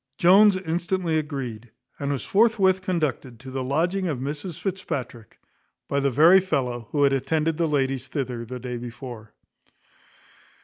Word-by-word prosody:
Jones 195 +3 +6
instantly 175 -1 -1
agreed, 130 -7 -6 0.3
and 140 -1 -2
was 135 -5 -3
forthwith 195 -3 +3
conducted 150 -10 -2
to 130 +1 -10
the 130 0 -3
lodging 175 +8 0
of 150 -6 -2
Mrs 145 +6 -5
Fitzpatrick 130 - -5 0.5
by 140 - 0
the 140 0 +1
very 160 +8 +6
fellow 125 - -2
who 145 -1 +1
had 140 -1 +4
attended 155 +4 0
the 170 -1 +1
ladies 135 -3 -1
thither 125 -4 -4
the 125 +2 -7
day 125 0 -5
before. 120 -2 -9
140 Hz, 145 wpm, -24 LUFS, 125-175 Hz, 0.5 s, Jones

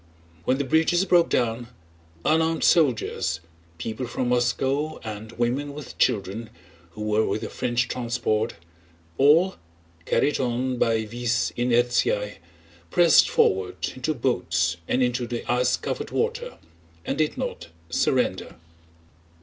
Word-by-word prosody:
When 130 - +2
the 140 - 0
bridges 160 +6 +2
broke 175 -3 +4
down, 120 0 0 0.6
unarmed 160 +1 +2
soldiers, 120 - +2 0.4
people 110 +9 -4
from 125 +1 -2
Moscow 135 +5 0
and 110 0 -7
women 130 +5 -1
with 150 -3 -9
children 110 -1 0 0.4
who 105 - -6
were 105 0 +2
with 110 - -1
the - - -5
French 120 -1 0
transport, 115 -2 -1 0.6
all—carried 85 - +1
on 125 0 -1
by 110 -1 +2
vis 120 +1 -1
inertiæ—pressed 105 - +1
forward 95 -1 +1
into 150 +5 -2
boats 90 -9 0
and 130 - +2
into 125 0 0
the 120 -1 -4
ice 125 +1 +2
covered - - -4
water 480 +2 -2 0.5
and 140 - -2
did 155 -1 0
not - - -4 0.2
surrender. - - 0
120 Hz, 115 wpm, -25 LUFS, 110-140 Hz, 0.6 s, broke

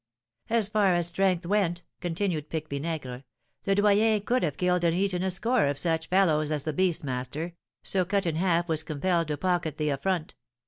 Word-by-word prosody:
"As 225 -3 +3
far 205 -4 +2
as 175 -1 +1
strength 180 0 0
went," 175 -3 0 0.2
continued 170 -3 -2
Pique 155 -1 -3
Vinaigre, 140 -3 -4 0.4
"Le 195 - +3
Doyen 210 +2 +4
could 245 +5 +1
have 150 -5 -1
killed 180 -1 +1
and 170 -1 +2
eaten 190 -2 0
a 190 - 0
score 220 - +1
of 140 0 -1
such 160 0 -1
fellows 160 -6 +3
as 150 -2 -1
the 155 - -2
beast 180 0 +1
master, 135 +6 -4 0.3
so 190 -2 +1
Cut 195 +2 0
in 160 -2 -1
Half 175 -1 +1
was 160 -2 +1
compelled 165 +2 0
to 150 -1 -2
pocket 175 -2 -1
the 150 -1 0
affront. 160 +4 -2
175 Hz, 190 wpm, -27 LUFS, 155-190 Hz, 0.4 s, Doyen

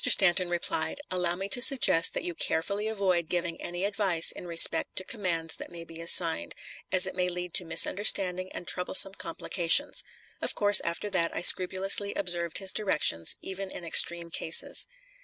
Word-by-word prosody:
Stanton 185 -1 +3
replied: 170 - -2
"Allow 180 -1 -2
me 190 +2 -7
to 245 - +3
suggest 245 - +3
that - - -5
you 175 - -5
carefully 200 +6 -3
avoid 185 -6 -3
giving 170 -2 -4
any 175 +2 -6
advice 195 -5 +1
in 180 - -11
respect 170 -1 +3
to 185 - -3
commands 170 -7 -5
that - - -11
may 170 -1 -11
be 165 0 -6
assigned, 165 - +2 0.4
as 185 0 +5
it 190 - -3
may 180 -1 -3
lead 180 -1 -7
to 180 - +1
misunderstanding 185 0 +2
and 175 - -11
troublesome 190 +1 +3
complications." 180 - 0 0.4
Of - - -3
course, 205 -1 +5
after 170 +5 -6
that 170 -3 -2
I - - -4
scrupulously 190 +3 +2
observed 175 -3 -2
his 190 -2 0
directions, 150 - -1
even 190 0 -8
in 175 - -10
extreme 170 0 +2
cases. 160 - +1
180 Hz, 170 wpm, -26 LUFS, 170-195 Hz, 0.4 s, as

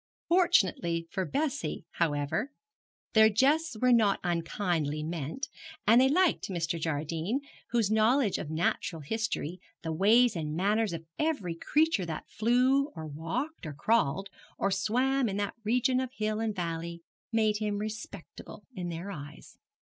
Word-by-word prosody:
Fortunately 190 - +3
for 190 - -1
Bessie, 285 - -2
however, 155 - -1 0.6
their 220 -1 +7
jests 275 +5 +2
were 250 +1 +4
not 215 -4 +4
unkindly 165 -3 -1
meant, 160 - -4 0.4
and 230 +4 +6
they 265 - +5
liked 355 - +2
Mr. 170 -2 -2
Jardine, 160 - -1 0.3
whose 230 -4 +1
knowledge 220 +1 +3
of - - -5
natural 160 0 -1
history, 185 -2 -3 0.2
the 160 - -2
ways 220 +7 +4
and 155 -2 -3
manners 210 +4 +1
of 165 0 -6
every 285 - 0
creature 295 - +1
that 160 -2 -5
flew, 255 +5 +2
or 160 -1 -6
walked, 165 - -4
or 150 - -5
crawled, 195 0 +1 0.3
or 200 - 0
swam 250 +6 +1
in 195 - -3
that 205 -1 -1
region 250 +3 +2
of 260 -1 -2
hill 215 0 -1
and 220 -2 -1
valley, 170 -1 -4 0.3
made 215 -2 +2
him 210 -1 -1
respectable 215 +1 -7
in 180 -5 -4
their 170 +4 -5
eyes. 145 -3 -10
205 Hz, 145 wpm, -29 LUFS, 165-240 Hz, 0.6 s, their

